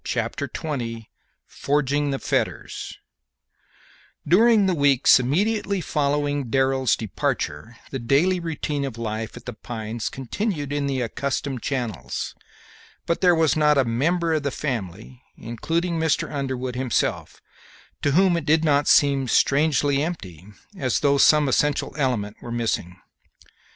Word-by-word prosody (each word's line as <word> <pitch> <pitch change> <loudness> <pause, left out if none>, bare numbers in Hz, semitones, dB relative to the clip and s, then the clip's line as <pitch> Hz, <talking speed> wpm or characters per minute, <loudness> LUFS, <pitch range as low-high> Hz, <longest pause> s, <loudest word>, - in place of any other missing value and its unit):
Chapter - - -2
XX 115 -7 -5 0.4
FORGING 145 0 0
THE 135 - -1
FETTERS - - -3 1.3
During 215 +5 +5
the 190 - +2
weeks 140 -5 +5
immediately 200 - 0
following 145 -4 -1
Darrell's 130 -1 +2
departure 110 -1 -3
the 135 - -3
daily 145 +10 +2
routine 155 -3 -3
of 135 -4 -5
life 110 0 -4
at 120 - -12
The 125 - -5
Pines 110 0 -5
continued 145 - -3
in 145 -1 -1
the 135 -2 -1
accustomed 135 +1 -3
channels, 110 - -3 0.7
but 170 - -1
there 180 -2 +5
was 160 -1 +2
not 150 -1 +3
a 135 - +3
member 165 +8 0
of 155 - +1
the 140 - -1
family, 120 - -5 0.2
including 165 +9 -2
Mr. 160 -2 0
Underwood 130 -3 -3
himself, 130 -2 -1 0.6
to 145 - +1
whom 185 +2 +4
it 165 -3 -2
did 160 +1 +3
not 145 -1 +2
seem 140 -2 +4
strangely 145 +1 +2
empty, 95 - -5 0.3
as 130 - -1
though 140 -1 +3
some 150 +1 +5
essential 145 +2 +1
element 120 -8 -1
were 120 - -8
missing. 115 -6 -2
140 Hz, 135 wpm, -23 LUFS, 120-155 Hz, 1.3 s, During